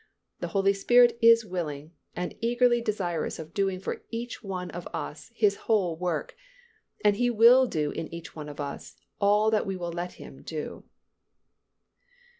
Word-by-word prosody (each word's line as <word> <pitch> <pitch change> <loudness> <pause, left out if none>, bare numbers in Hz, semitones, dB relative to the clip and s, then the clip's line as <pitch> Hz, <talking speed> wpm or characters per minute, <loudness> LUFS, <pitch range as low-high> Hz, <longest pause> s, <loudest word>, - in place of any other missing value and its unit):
The - - -3
Holy 195 -1 +2
Spirit 240 +4 +5
is 230 0 +6
willing 160 -5 -5 0.2
and 180 0 -3
eagerly 240 +1 +3
desirous 180 -8 -2
of 160 +1 -9
doing 195 -2 0
for 190 - -5
each 235 +1 -6
one 185 -3 -5
of 175 0 -7
us - - -6
His 415 -1 +2
whole 190 -7 +2
work, 175 - -3 0.7
and 205 -1 +4
He 245 +1 +2
will 240 +3 +6
do 150 -7 -1
in 160 - -5
each 170 0 -9
one 150 -2 -7
of 145 - -10
us 140 -1 -6 0.2
all 210 +1 +3
that 215 -1 +1
we 195 - -2
will 175 -1 -4
let 175 +1 -4
Him - - -12
do. - - -6
195 Hz, 165 wpm, -27 LUFS, 170-230 Hz, 0.7 s, is